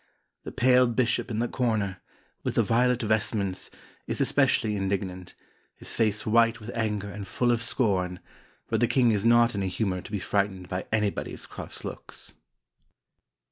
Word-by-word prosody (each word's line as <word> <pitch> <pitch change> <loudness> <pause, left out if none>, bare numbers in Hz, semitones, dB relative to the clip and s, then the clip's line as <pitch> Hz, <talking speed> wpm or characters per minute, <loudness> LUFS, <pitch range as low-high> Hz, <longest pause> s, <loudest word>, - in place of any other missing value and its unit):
The - - -5
pale 125 0 +4
bishop 120 +1 0
in 110 - -3
the 120 +2 +1
corner, 110 -7 -1 0.4
with - - -3
the - - +4
violet 125 +1 +2
vestments, 105 -3 -1 0.4
is - - -1
especially 105 -1 +2
indignant, 95 -2 -3 0.4
his - - -4
face 110 -2 +1
white 115 +1 +3
with 110 +2 -7
anger 105 -3 -2
and 100 -1 -7
full 120 -1 +1
of 115 -1 +1
scorn, 95 -7 0 0.5
but - - 0
the 120 - +3
king 120 0 +3
is 105 -2 0
not 120 0 +5
in 100 - -2
a 95 - -1
humor 95 -1 -1
to - - -12
be 105 - -1
frightened 95 0 -1
by 90 0 -3
anybody's 105 -2 -1
cross - - -8
looks." - - -8
110 Hz, 165 wpm, -27 LUFS, 100-120 Hz, 0.5 s, not